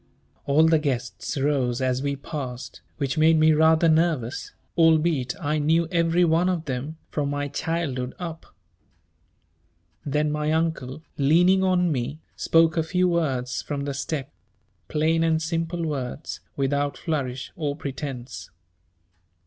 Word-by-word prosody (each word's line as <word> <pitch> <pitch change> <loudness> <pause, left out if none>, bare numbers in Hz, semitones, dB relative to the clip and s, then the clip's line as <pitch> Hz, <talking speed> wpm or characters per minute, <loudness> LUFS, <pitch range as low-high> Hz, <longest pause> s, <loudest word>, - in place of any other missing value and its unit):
All 145 +3 +5
the 160 -1 +4
guests 130 -2 -3
rose 135 -3 +1
as 130 -1 0
we 140 0 -1
passed, 135 -3 -6 0.2
which 140 +1 -1
made 160 +1 +5
me 155 0 +5
rather 160 +2 +4
nervous, 155 -7 +1 0.2
albeit 160 -5 +3
I 150 -1 0
knew 160 +3 +2
every 170 0 +3
one 170 +2 +3
of 170 -3 -1
them 140 +3 -4
from 145 -2 -1
my 145 0 -2
childhood 140 -5 -2
up. 165 -2 -7 1.6
Then 150 +1 0
my 150 0 -1
Uncle, 160 -3 -2 0.2
leaning 175 +7 +4
on 180 -2 +2
me, 135 +2 -2 0.2
spoke 165 0 +3
a - - +4
few 180 +3 +1
words 130 -8 -1
from 140 -1 -4
the 140 - -2
step, 135 0 -4 0.6
plain 160 +2 +1
and 160 -1 +2
simple 165 +1 -2
words 140 -1 -4 0.2
without 140 +1 0
flourish 135 -6 -3
or 145 -4 -2
pretence. 130 -5 -6
150 Hz, 135 wpm, -25 LUFS, 135-165 Hz, 1.6 s, All